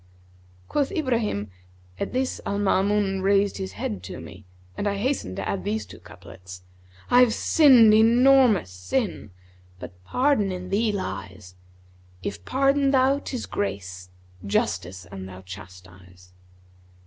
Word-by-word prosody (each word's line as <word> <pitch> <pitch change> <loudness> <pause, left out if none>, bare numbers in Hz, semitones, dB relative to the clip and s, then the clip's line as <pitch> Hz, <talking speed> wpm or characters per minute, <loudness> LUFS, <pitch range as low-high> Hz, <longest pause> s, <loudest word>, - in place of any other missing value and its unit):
(Quoth 285 -2 -1
Ibrahim), 230 - -1 0.5
At - - -3
this 260 +1 -2
Al 200 - -2
Maamun 195 0 +1
raised 200 +1 +2
his 95 0 -5
head 100 -1 -4
to 95 - -8
me 95 +4 -12 0.3
and 205 - -2
I 200 - 0
hastened 230 - -2
to - - -4
add 95 -2 -3
these 105 +2 -2
two 95 - -13
couplets, 90 0 -13 0.5
'I've 245 -2 +5
sinned 250 -8 +6
enormous 235 - +5
sin, 90 0 -3 0.3
* 90 0 -29
But 90 +1 -11
pardon 250 - +1
in 185 0 -6
thee 215 +2 +1
lies: 95 - -6 0.7
If 85 - -5
pardon 275 - +2
thou, 270 +1 +3
'tis 255 -4 -5
grace; 95 - -5 0.2
* 90 0 -25
Justice 90 0 -3
an 95 -1 -7
thou 95 0 -11
chastise!' 90 -1 -13
185 Hz, 135 wpm, -24 LUFS, -, 0.7 s, sinned